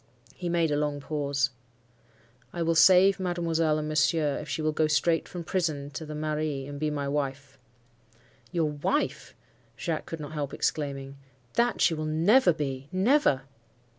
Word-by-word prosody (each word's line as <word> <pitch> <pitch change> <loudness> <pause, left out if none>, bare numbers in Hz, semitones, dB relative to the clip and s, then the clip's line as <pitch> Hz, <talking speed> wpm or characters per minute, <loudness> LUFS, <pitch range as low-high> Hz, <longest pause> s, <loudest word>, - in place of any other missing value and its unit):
"He 175 - -5
made 170 -2 +1
a - - +2
long 145 -1 -1
pause. 140 -2 -1 1.0
'I 170 - -2
will 165 0 +2
save 185 +4 +6
mademoiselle 165 -3 0
and 150 0 -3
monsieur, 155 -1 +1
if - - -8
she 155 - -2
will 155 - +2
go 155 0 +1
straight 165 +2 +1
from 175 -1 -6
prison 155 -5 -2
to 160 +1 -7
the 150 - -6
mairie, 150 -2 -2
and 145 0 -7
be 155 0 0
my 145 -2 -3
wife.' 140 -1 -3 0.9
"'Your 170 -3 +1
wife!' 145 -1 -2 0.4
Jacques 160 -3 -3
could 165 - -6
not 150 -1 -7
help 145 -3 -4
exclaiming, 140 -2 -2 0.4
'That 240 0 +1
she 170 - +4
will 155 -1 -3
never 175 +8 +4
be—never! 150 - +1
155 Hz, 160 wpm, -27 LUFS, 145-170 Hz, 1.0 s, save